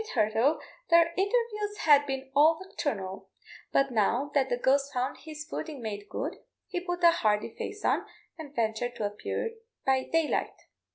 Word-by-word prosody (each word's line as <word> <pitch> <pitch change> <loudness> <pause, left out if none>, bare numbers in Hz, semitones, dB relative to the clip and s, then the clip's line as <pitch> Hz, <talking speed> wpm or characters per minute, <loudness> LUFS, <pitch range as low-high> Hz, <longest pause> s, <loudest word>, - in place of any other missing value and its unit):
Hitherto 235 - +2 0.3
their 335 0 +5
interviews 420 0 0
had 290 -2 +6
been 270 -1 -4
all 315 +3 +6
nocturnal, 215 - -4 0.4
but 275 -1 +3
now 240 +5 +1
that 270 -2 +2
the 245 - +1
ghost 275 +3 +2
found 250 0 -1
his 305 -1 -8
footing 310 -2 -5
made 205 -3 -5
good, - - -3 0.3
he 360 - -3
put 355 0 -4
a 340 - +9
hardy 210 -8 +1
face 415 - -6
on, - - +1 0.3
and 295 -3 -10
ventured 230 +2 -1
to 220 -3 -2
appear 210 - -3 0.3
by 265 -1 +2
daylight. 325 -2 +1
280 Hz, 160 wpm, -29 LUFS, 240-335 Hz, 0.4 s, a